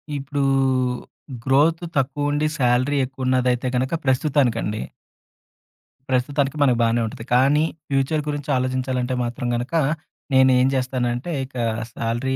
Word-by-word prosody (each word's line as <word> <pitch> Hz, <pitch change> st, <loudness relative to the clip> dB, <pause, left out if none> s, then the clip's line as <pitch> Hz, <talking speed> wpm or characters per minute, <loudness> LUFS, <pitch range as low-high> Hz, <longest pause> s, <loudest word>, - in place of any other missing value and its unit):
ఇప్పుడూ 140 Hz, +1 st, -3 dB, 1.0 s
growth 150 Hz, +6 st, +3 dB
తక్కువుండి 145 Hz, +2 st, 0 dB
salary 130 Hz, +2 st, +2 dB
ఎక్కువ 130 Hz, 0 st, -6 dB
ఉన్నదైతే 125 Hz, -1 st, +1 dB
గనుక 130 Hz, +3 st, 0 dB
ప్రస్తుతానికండి... 130 Hz, -5 st, +1 dB, 1.3 s
ప్రస్తుతానికి 140 Hz, +2 st, 0 dB
మనకు 125 Hz, -4 st, +4 dB
బానే 115 Hz, 0 st, +2 dB
ఉంటది. 115 Hz, +1 st, -7 dB
కానీ, 140 Hz, +4 st, +4 dB, 0.3 s
ఫ్యూచర్ 140 Hz, +3 st, +1 dB
గురించి 145 Hz, -1 st, -4 dB
ఆలోచించాలంటే 130 Hz, 0 st, -1 dB
మాత్రం 120 Hz, +1 st, -3 dB
గనక, 120 Hz, +6 st, -4 dB, 0.6 s
నేనేం 130 Hz, -1 st, +5 dB
జేస్తానంటే 125 Hz, +2 st, -1 dB
ఇక 130 Hz, -, -19 dB, 0.4 s
సాలరీ 120 Hz, +3 st, -2 dB
130 Hz, 105 wpm, -22 LUFS, 125-140 Hz, 1.3 s, నేనేం